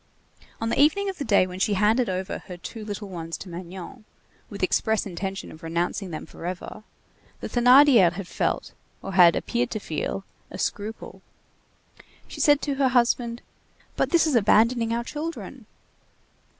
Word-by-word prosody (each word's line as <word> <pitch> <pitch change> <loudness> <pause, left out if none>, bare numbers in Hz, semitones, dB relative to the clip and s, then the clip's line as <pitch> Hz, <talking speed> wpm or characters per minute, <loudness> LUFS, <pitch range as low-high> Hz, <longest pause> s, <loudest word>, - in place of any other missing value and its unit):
On 225 - -2
the - - -1
evening 390 +7 +3
of 380 - -6
the - - -1
day 205 -6 +4
when 185 0 -8
she 205 - +1
had 200 +2 +2
handed 230 +2 +2
over 185 0 -3
her 180 -2 -8
two 215 +5 -8
little 205 -1 -6
ones 165 -3 -6
to 190 - -10
Magnon, 180 +6 -9 0.5
with - - -6
express 220 -1 +1
intention 195 +1 -5
of 160 - -13
renouncing 175 +4 -2
them 160 - -6
forever, 180 +4 -7 0.6
the - - -5
Thénardier 245 -6 +6
had 190 0 -7
felt, - - -2 0.3
or 195 - -5
had 175 -2 +7
appeared 120 +1 -1
to 215 - -4
feel, 195 +2 -4 0.2
a - - -8
scruple. 210 +3 -4 1.1
She - - -10
said 290 -3 +4
to 285 -2 -1
her 270 - +5
husband: 240 -1 +1 0.5
"But - - 0
this 340 -2 +4
is 310 - 0
abandoning 230 +1 +3
our 235 +1 -1
children!" 310 +6 -6
210 Hz, 165 wpm, -25 LUFS, 185-245 Hz, 1.1 s, had